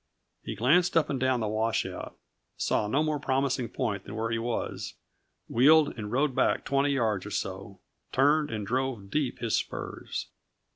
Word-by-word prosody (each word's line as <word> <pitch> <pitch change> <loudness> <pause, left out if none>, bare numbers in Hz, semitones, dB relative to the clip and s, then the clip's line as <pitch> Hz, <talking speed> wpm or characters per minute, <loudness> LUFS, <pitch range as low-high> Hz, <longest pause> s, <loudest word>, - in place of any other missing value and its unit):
He - - -5
glanced 170 +9 +3
up 160 - +2
and 135 - -1
down 130 -1 +2
the 110 - 0
washout, 110 +2 -2 0.4
saw 105 - +1
no 140 +8 +2
more 155 -1 0
promising 130 -3 0
point 100 -4 -2
than 100 - -8
where 110 +1 -2
he 115 - 0
was, 120 0 -3 0.5
wheeled 150 +5 +5
and 105 -3 -6
rode 135 +3 +2
back - - +1
twenty 140 +1 +2
yards 110 -8 +1
or 105 - -7
so, 95 -1 -4 0.3
turned 145 +3 +3
and 110 -2 -3
drove 120 -3 -2
deep 145 -1 0
his 115 -3 0
spurs. - - -4
125 Hz, 165 wpm, -28 LUFS, 110-140 Hz, 0.5 s, wheeled